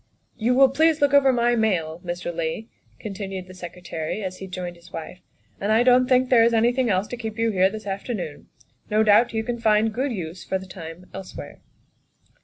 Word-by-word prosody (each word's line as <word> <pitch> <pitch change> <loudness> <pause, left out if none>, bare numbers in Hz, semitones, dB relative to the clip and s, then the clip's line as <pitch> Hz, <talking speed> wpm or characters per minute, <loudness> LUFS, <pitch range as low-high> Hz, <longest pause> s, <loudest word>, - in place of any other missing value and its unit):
" - - -43
You 245 +2 +1
will 270 0 +6
please 315 +3 +3
look 285 -1 +2
over 275 -1 +6
my 240 -1 +2
mail, 175 -7 0
Mr. 175 0 -4
Leigh," 165 +6 -3 0.3
continued 195 -3 -6
the 185 - -13
Secretary 180 +1 -6
as 185 -1 -5
he 190 - -8
joined 180 -1 -6
his 170 0 -18
wife, 165 +3 -7 0.2
" - - -35
and 200 +2 0
I 225 +2 +4
don't 250 0 +5
think 255 0 +3
there 235 -3 +7
is 230 0 +3
anything 240 +2 +2
else 190 0 +1
to 245 - -5
keep 220 -2 -6
you 230 0 +1
here 190 -1 +3
this 215 +1 -8
afternoon. 195 - -5 0.4
No 215 +1 +3
doubt 215 +3 +5
you 220 -1 -1
can 235 +1 -3
find 220 0 +3
good 265 +4 -1
use 175 -4 -6
for 190 - -1
the 190 - -9
tune 175 -1 -10
elsewhere." 190 -1 -9
210 Hz, 210 wpm, -24 LUFS, 185-240 Hz, 0.4 s, there